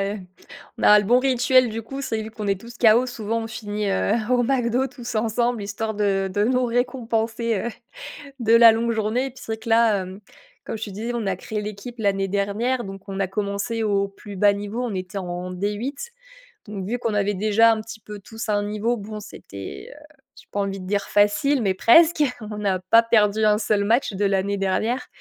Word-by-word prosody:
heu, - - -7 0.6
on - - -6
a 210 0 +8
le 205 - -2
bon 245 +5 +4
rituel, 255 -1 +3
du 225 +1 -4
coup. 270 +5 -7
C'est 225 -5 -2
vu 220 - -7
qu'on 215 -2 -6
est 195 -1 0
tous 235 +3 -12
chaos, 235 +1 +5
souvent, 230 -2 -3
on - - -5
finit, 210 -2 -4
heu, 195 +1 +1 0.2
au 245 -1 +3
McDo 250 0 +1
tous 245 -2 -8
ensemble, 230 +1 0
histoire 220 +2 -3
de 195 -2 0
de 205 - +1
nous 250 +2 +2
récompenser, 235 -2 -1
heu - - -1 0.7
de 225 -1 +3
la 230 -1 +9
longue 230 +1 0
journée. 225 +4 -1
Puis, 260 - -15
c'est 220 - -3
que - - -8
là, 225 -4 +3 0.6
comme - - -4
tu 215 -1 -6
disais, 225 +5 -4
on 230 -3 -2
a 190 -1 0
créé 210 +3 -5
l'équipe 210 +3 -7
l'année 195 -2 0
dernière, 205 +6 -1
donc 195 0 -10
on 195 0 -5
a 195 - +1
commencé 200 +3 -3
au 200 -1 +1
plus 200 0 -11
bas 205 +2 +5
niveau. 205 +4 -4
On 230 -4 -3
était 185 +1 -5
en 180 -1 -5
D8. 210 - -3 0.6
Donc, 200 -2 -5
vu 240 +4 -1
qu'on 230 -2 -2
avait 205 0 +1
déjà 215 +3 +4
un 220 - -3
petit 225 0 -10
peu 210 0 -10
tous 225 +3 -8
à 215 - +1
un 205 0 +1
niveau, 215 +3 -1
bon, 215 -1 -7
c'était, 100 - -9
heu, - - -16 0.3
j'ai - - -15
pas 205 - -1
envie 195 0 -3
de 185 - -9
dire 200 +1 0
facile, 210 +7 +2
mais 195 -4 +1
presque. 310 - +5 0.3
On 210 - -5
n'a 195 -3 0
pas 205 +6 +4
perdu 215 -2 +2
un 210 0 +4
seul 210 -1 +1
match 225 +2 +1
de 195 +2 -2
l'année 195 0 +1
dernière. 215 +6 -1
215 Hz, 215 wpm, -23 LUFS, 200-235 Hz, 0.7 s, la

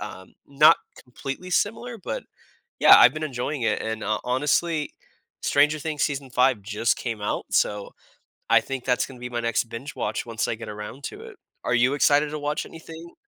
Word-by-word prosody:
um, 95 0 -9
not 150 +3 +6 0.3
completely 135 +8 -7
similar, 230 +5 -1
but, - - -5 0.6
yeah, - - +9
I've - - +7
been 155 - -6
enjoying 135 -1 -3
it, 115 - +1
and, 110 0 -4
uh, 110 - 0
honestly, 150 +5 0 0.5
Stranger 150 +2 +3
Things 155 -1 -2
season 140 -2 -2
5 125 -3 +2
just 105 +3 0
came 115 -3 -4
out, 105 - -2
so 105 -1 0 0.6
I - - +7
think 135 -2 -6
that's 125 -1 +1
gonna 130 -2 -12
be 125 - -5
my 120 -1 -2
next 115 -1 0
binge 115 +5 -8
watch - - -2
once 115 -2 -2
I - - 0
get 115 - -9
around 105 +6 -8
to - - -8
it. 455 -3 -11 0.3
Are 125 - +1
you 125 +3 +3
excited 145 +1 +3
to 155 - -4
watch 150 +1 -2
anything? 165 +1 -11
135 Hz, 190 wpm, -24 LUFS, 115-155 Hz, 0.6 s, yeah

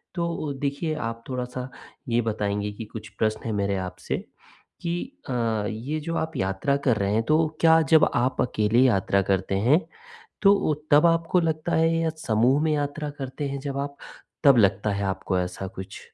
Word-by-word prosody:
तो 170 -4 -2
देखिए, 145 +3 -1
आप 115 -4 -4
थोड़ा-सा 125 0 -4 0.4
ये 120 0 +2
बताएँगी 105 -2 -2
कि 110 +2 -7
कुछ 110 -2 -7
प्रश्न 110 0 0
है 115 - -2
मेरे 100 0 0
आपसे - - -4 0.6
कि 170 -1 -2 0.4
अ, - - -1 0.4
ये 130 +9 -4
जो 165 +2 -4
आप 160 -1 -3
यात्रा 95 +8 0
कर 115 -4 +4
रहे 100 +1 0
हैं, 110 +1 +2
तो 155 +3 +3
क्या 160 0 +6
जब 160 - +7
आप 125 +2 +1
अकेले 110 0 +1
यात्रा 100 -5 +3
करते 95 0 0
हैं, 155 +4 +6 0.6
तो 200 -6 +4 0.2
तब 150 +3 +6
आपको 165 +2 +3
लगता 160 0 -1
है 165 +1 +3
या 165 0 +1 0.2
समूह 120 +6 +3
में 160 - +2
यात्रा 145 +1 -2
करते 135 +2 -4
हैं 140 0 -4
जब 140 0 -4
आप, 140 0 -3 0.5
तब 140 -4 +7
लगता 100 0 +3
है 100 0 -2
आपको 95 -1 -1
ऐसा 90 +1 -4
कुछ? 95 -2 -9
130 Hz, 180 wpm, -25 LUFS, 105-155 Hz, 0.6 s, जब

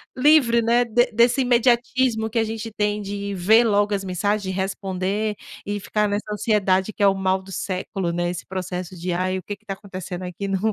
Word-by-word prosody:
livre, 255 -4 +5
né, 240 +2 +3
de 240 +2 +2
desse 235 +4 +3
imediatismo 245 -1 +2
que 230 +1 0
a 225 - +2
gente 225 0 -5
tem 210 0 -1
de 200 0 -4
ver 220 +6 +5
logo 205 -1 +2
as 195 -1 -2
mensagens, 185 +2 -1
de 190 - -5
responder 195 +2 -2 0.3
e 205 +1 -2
ficar 210 +1 0
nessa 205 +1 -1
ansiedade, 205 -2 +1
que - - -2
é 200 - +7
o 195 - +4
mal 190 0 0
do 195 - -12
século, 185 -2 -3
né, 175 0 -1
esse 175 -1 -5
processo 185 -1 -5
de: 180 +1 -3
"Aí, 185 +2 0
o 185 - -7
que 205 +1 -6
que 215 - -36
tá 195 - -3
acontecendo 185 -2 -7
aqui 180 +3 -5
no?". 195 +3 0
205 Hz, 215 wpm, -23 LUFS, 185-220 Hz, 0.3 s, é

